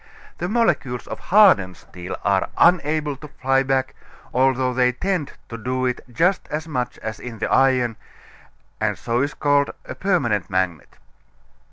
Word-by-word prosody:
The 175 - -2
molecules 175 - 0
of - - -7
hardened 175 - +4
steel 90 0 -8
are 100 -2 +1
unable 155 -4 +3
to 150 - -10
fly 135 -2 +1
back, 130 -1 0 0.4
although 130 0 +2
they 125 0 +2
tend 180 0 -2 0.2
to 115 - -7
do 130 +2 -2
it 125 -1 -1
just 175 +9 +1
as 155 +2 -4
much 125 -5 -3
as 110 0 -5
in 120 -2 -8
the 110 - -3
iron, 130 -4 +3 0.8
and - - 0
so 120 +1 -1
it - - +3
is 145 - -6
called 145 -1 +2 0.2
a - - -6
permanent 130 - 0
magnet. 95 -5 -2
130 Hz, 160 wpm, -22 LUFS, 120-150 Hz, 0.8 s, hardened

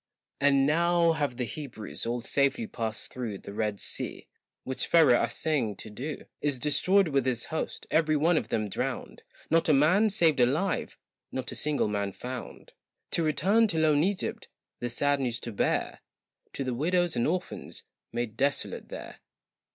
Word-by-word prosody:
And 140 -1 +4
now 170 +2 +3
have 145 -6 -1
the 125 - -1
Hebrews 120 -4 -6
all 120 +1 -1
safely 140 - +1
passed 115 - -5
through 115 -6 -4
The 100 - -10
Red 105 -1 -1
Sea, - - -3 0.4
which 130 - -3
Pharaoh 150 -8 +6
assaying 135 -10 0
to 110 - -10
do 135 +7 -6 0.2
Is 145 -3 0
destroyed 170 +7 +3
with 135 -3 +1
his 120 -3 0
host, 160 - -3
every 155 -1 +3
one 165 +4 +3
of - - 0
them 110 -1 -1
drowned, 100 - -4 0.3
Not 165 0 +3
a - - +6
man 180 +10 +5
saved 170 -8 +3
alive, 150 +11 +1 0.3
not 130 -1 -4
a - - -6
single 150 -5 0
man 100 -1 -2
found 125 +3 -8 0.4
To - - +1
return 190 +9 +3
to 165 - -3
lone 155 -2 +4
Egypt, 195 +1 -2 0.3
the 120 - -2
sad 145 +4 +1
news 120 -3 -1
to 120 - -5
bear 100 - 0 0.5
To 140 - -3
the 130 -1 -2
widows 175 +5 +1
and 120 - +1
orphans 180 +3 -3 0.3
made 120 -2 -3
desolate 140 +4 -1
there. - - -8
145 Hz, 165 wpm, -28 LUFS, 120-160 Hz, 0.5 s, Pharaoh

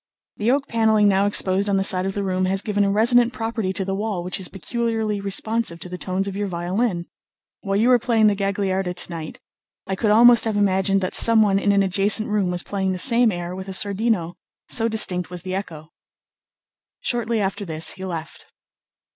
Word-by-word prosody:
The 215 +2 -1
oak 275 +2 +1
panelling 220 -2 +2
now 200 0 +2
exposed 200 0 +2
on 195 - +1
the 195 - +1
side 185 -1 +3
of 195 - -4
the 200 - -2
room 185 -1 -1
has 190 +1 -1
given 205 -1 0
a 200 - +1
resonant 235 +4 +3
property 225 -4 -3
to 190 - -3
the 195 - -3
wall 200 -3 -3
which 180 +2 -5
is 185 - -3
peculiarly 220 0 -3
responsive 200 -1 -2
to 180 - -8
the 180 - -6
tones 190 +1 -2
of 195 - -5
your 205 0 -2
violin. 180 +1 -2 0.6
While 195 -1 -2
you 225 +5 +2
were 250 -1 +5
playing 225 -2 +2
the 210 - +4
Gagliarda 195 -2 -2
to - - -4
night, 160 -2 -7 0.5
I 190 - -3
could 210 +3 -1
almost 235 +3 +6
have 220 -2 -1
imagined 195 -1 +1
that 185 - -3
someone 215 -4 +4
in 200 - +1
an 200 0 +3
adjacent 200 +3 +1
room 205 -3 0
was 180 -1 -2
playing 190 -2 -2
the - - -4
same 235 +3 +3
air 175 0 -5
with 190 +1 -8
a 190 - -5
sordino, 200 -3 +1 0.3
so 225 -1 0
distinct 185 -6 +1
was 180 -1 -7
the 185 0 -5
echo." 160 -5 -6 1.1
Shortly 235 -2 -1
after 200 +1 -2
this 160 -3 -2
he 190 - -9
left. 165 -4 -7
195 Hz, 205 wpm, -22 LUFS, 185-220 Hz, 1.1 s, almost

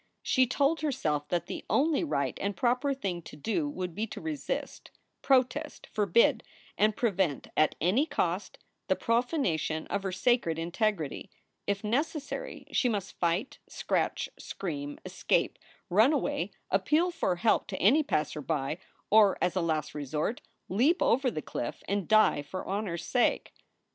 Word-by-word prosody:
She 260 -1 +3
told 280 +5 +1
herself 155 - -1
that 175 -1 -1
the - - -6
only 305 +2 +2
right 140 - -1
and 200 -1 -2
proper 250 +6 +1
thing 195 -10 -3
to - - -11
do 260 - -1
would 180 - -4
be 220 +6 -2
to - - -7
resist, 320 - -4 0.3
protest, 270 +3 +1
forbid, 210 +1 +3 0.3
and 215 0 +3
prevent 190 - 0
at 155 - +3
any 210 - +2
cost 180 - -2 0.3
the 190 - +3
profanation 230 - 0
of - - 0
her 195 -1 -3
sacred 190 -3 +1
integrity. 170 -1 -1 0.4
If 200 0 -1
necessary, 295 - -2
she 250 - +2
must 205 -5 -4
fight, 170 +4 0
scratch, - - -1
scream, 145 -6 -5
escape, - - 0 0.3
run 220 - +5
away, - - -1 0.2
appeal 335 +4 +2
for 330 - 0
help 220 +5 +2
to 190 - -4
any 260 +11 +5
passer 150 - -1
by, 150 +1 -2 0.3
or, 210 -2 +6
as 180 - 0
a 185 - +1
last 155 -3 -1
resort, 150 - -2 0.3
leap 265 - +3
over 260 +2 +3
the 155 -10 -5
cliff 120 - -5
and 200 -2 -1
die 215 -8 +5
for 185 +6 -6
honor 200 -3 -2
s 170 - -6
sake. 245 - +1
205 Hz, 155 wpm, -29 LUFS, 170-255 Hz, 0.4 s, or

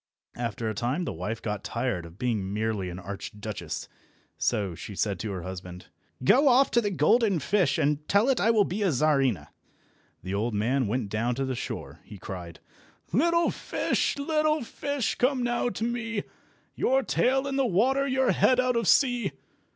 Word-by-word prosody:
After 115 -1 -3
a 110 - -1
time 125 - -1
the - - -3
wife 105 +7 -4
got 105 -2 -3
tired 115 -8 -2
of 85 +2 -15
being 105 -5 -1
merely 105 -3 -1
an 90 - -7
Archduchess, 100 +2 -6 0.5
so 100 -4 0
she 100 +4 -8
said 100 -2 -1
to 105 - -3
her 90 -3 -5
husband— 90 -1 -8 0.3
"Go 270 - +5
off 265 +1 +5
to 235 - +4
the 205 - 0
golden 200 - +3
fish, 185 +5 +1
and 150 0 0
tell 205 +4 +3
it 265 -3 +2
I 220 - +3
will 220 -3 +5
be 195 +4 -3
a 200 - +3
Czarina." 135 - +1 0.7
The 95 +2 -4
old 105 +3 -1
man 120 +4 +1
went 110 -1 -2
down 115 +4 -1
to 135 +2 -1
the 130 - -2
shore. 120 - -6
He 105 - -11
cried— 90 -3 -8 0.5
"Little 335 - +3
fish, - - -1
little 305 0 +1
fish, 285 +1 -2
come 255 0 +1
now 240 0 0
to 220 0 -5
me, 230 -3 -2 0.5
Your 265 +1 +2
tail 265 +2 +1
in 275 -1 -2
the 270 -2 +2
water, 265 +8 +2
your 265 -1 +2
head 255 -1 +3
out 255 -1 +2
of 230 -4 0
sea!" 245 - +3
150 Hz, 180 wpm, -27 LUFS, -, 0.7 s, Go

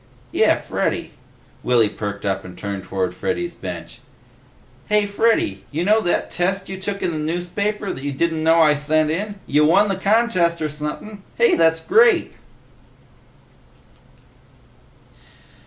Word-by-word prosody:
"Yeh, - - +3
Freddy." - - -3 0.5
Willy 120 -3 +3
perked 100 -1 -6
up 95 -1 -1
and 90 -1 -11
turned 100 -1 -5
toward 95 -2 -2
Freddy's 345 - -3
bench. - - -8 0.9
"Hey, 210 -1 +2
Freddy! 225 +3 +2
Hey, 95 - -18
you 160 +4 -2
know 215 +2 +4
that 175 - -1
test 190 +2 -1
you 190 -1 -6
took 200 +1 -4
in 175 - 0
the 155 - -4
newspaper 180 +6 -2
that 135 - -9
you 145 - -2
didn't 160 +3 -1
know 165 +1 +5
I 155 -2 +5
sent 155 +1 +1
in? 205 +5 -3
You 150 +2 +2
won 195 +7 +4
the 195 - 0
contest 190 -4 +1
or 155 - -2
sumpin'! 150 +8 -6 0.2
Hey, 475 -5 +4
that's 165 0 +2
great!" 455 +3 +4
170 Hz, 145 wpm, -21 LUFS, 150-205 Hz, 0.9 s, know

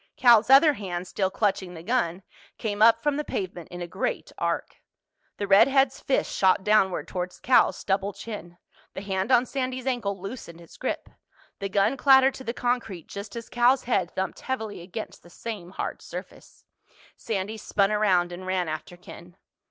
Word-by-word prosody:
Cal's 240 -2 +6
other 285 +3 +7
hand, 185 -6 -5
still 190 +1 -1
clutching 190 -3 -1
the 165 - -9
gun, 195 -5 -1 0.3
came 210 -2 -3
up 230 +1 +6
from 295 -1 +1
the 300 - -1
pavement 180 - -5
in 175 0 -6
a - - -6
great 190 +3 -3
arc. - - -2 0.6
The 205 - -2
redhead's 270 +7 +4
fist 270 - -1
shot 190 0 +3
downward 200 -3 +2
toward 180 -1 -4
Cal's 255 - +4
stubbled 195 0 -1
chin. 175 -6 -8 0.4
The 190 - -5
hand 195 +3 -2
on 250 0 +5
Sandy's 255 -1 -3
ankle 225 -7 -1
loosened 195 -4 -8
its 170 - -15
grip. - - -3 0.5
The 200 -1 -3
gun 200 +7 +2
clattered 265 0 +6
to 260 - -9
the 235 - -2
concrete 240 -8 -2
just 200 +3 -8
as 230 -1 -6
Cal's 245 +2 +3
head 195 -8 0
thumped 190 0 -3
heavily 220 -8 -4
against 190 +5 -7
the 175 - -17
same 200 -1 -7
hard 185 - -5
surface. - - -10 0.5
Sandy 215 0 -3
spun 200 -1 +1
around 185 -5 +2
and 185 +1 -8
ran 185 -2 0
after 155 +3 -6
Ken. 175 0 -13
200 Hz, 175 wpm, -26 LUFS, 185-240 Hz, 0.6 s, other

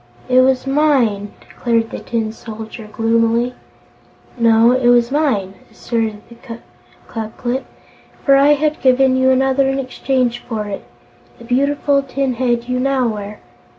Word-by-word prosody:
"It 255 0 +5
was 260 0 +2
mine!" 265 -8 +1
declared 230 -2 -2
the - - -5
Tin 225 -2 -3
Soldier, 220 0 -9
gloomily. 230 +2 +1 0.8
"No, 230 -1 +4
it 255 -1 +1
was 240 0 +4
mine," 260 -11 0 0.2
asserted 225 -3 -3 0.8
Ku 220 -1 -5
Klip, 255 +2 -3 0.6
"for 275 - +6
I 280 +2 +5
had 300 +1 -1
given 260 0 +4
you 260 0 +3
another 265 +1 +2
in 270 - -1
exchange 255 -2 -1
for 220 -3 -5
it 205 -1 -6 0.5
the 235 - -13
beautiful 280 +3 +1
tin 270 -1 -2
head 240 -1 -1
you 250 0 -1
now 260 -2 +1
wear. 210 -1 -7
250 Hz, 140 wpm, -17 LUFS, 225-270 Hz, 0.8 s, for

